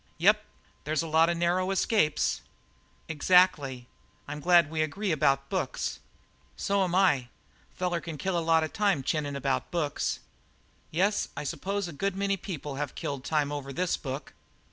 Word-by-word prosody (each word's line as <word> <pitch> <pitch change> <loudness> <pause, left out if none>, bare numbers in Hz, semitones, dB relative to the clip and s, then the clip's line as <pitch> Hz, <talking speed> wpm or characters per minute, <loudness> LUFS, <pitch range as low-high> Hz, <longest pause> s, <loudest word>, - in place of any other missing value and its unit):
"Yep, - - +5 0.4
there's 155 +2 0
a - - -4
lot 160 +1 +4
of 170 - 0
narrow 175 +2 +1
escapes." 195 -4 +1 0.7
"Exactly. 150 -6 +3 0.4
I'm 145 +1 -5
glad 175 +1 +5
that 145 - -14
we 160 -1 0
agree 190 +6 -1
about 140 -3 +2
books." - - -2 0.6
"So'm 190 -3 +1
I. 175 -10 +3 0.5
Feller 175 -2 -1
can 165 -3 -6
kill 190 +5 -1
a - - +2
lot 165 -1 +3
of 155 - -4
time 200 -9 +1
chinning 145 0 -1
about 135 -1 -1
books." 155 -5 -1 0.7
"Yes, 195 +5 +1
I - - -3
suppose 195 +7 -2
a 170 - -7
good 195 +5 -1
many 195 0 +1
people 150 -7 -6
have 145 0 -3
killed 140 -2 -4
time 150 -1 0
over 140 -2 -5
this 180 +6 0
book." 135 0 -6
160 Hz, 165 wpm, -28 LUFS, 145-185 Hz, 0.7 s, Yep